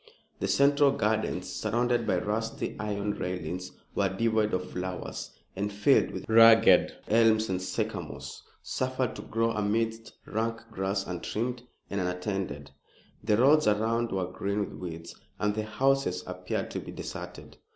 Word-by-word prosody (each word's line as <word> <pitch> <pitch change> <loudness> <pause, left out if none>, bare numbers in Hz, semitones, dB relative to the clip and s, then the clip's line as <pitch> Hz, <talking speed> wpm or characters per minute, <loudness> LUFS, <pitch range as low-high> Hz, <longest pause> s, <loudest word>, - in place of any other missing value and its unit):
The 95 - -1
central 140 +7 +4
gardens, 105 -5 0
surrounded 120 +2 0
by 90 - +2
rusty 110 +4 -2
iron 105 -1 -2
railings, 90 -1 -4 0.2
were 100 -1 +1
devoid 110 +2 +1
of 90 0 -2
flowers 90 0 -5 0.3
and 100 +2 -2
filled 105 +7 +3
with - - -7
ragged 115 -4 +7
elms 110 -1 +4
and 90 -1 -1
sycamores, 95 - -4 0.2
suffered - - -1
to - - -6
grow 115 +1 0
amidst 110 +1 -1
rank 115 +1 -2
grass 95 -1 -1
untrimmed 115 +7 -3 0.3
and 100 -1 -1
unattended. 90 -5 -3 0.5
The 105 -1 +3
roads 145 +4 +5
around 115 +3 +1
were 95 -1 0
green 100 +3 -3
with 100 - -4
weeds, 85 -2 -7 0.2
and 105 0 +1
the 110 0 -2
houses 110 -5 +1
appeared 90 0 -4
to - - -3
be - - -8
deserted. - - -8
105 Hz, 140 wpm, -29 LUFS, 95-115 Hz, 0.5 s, ragged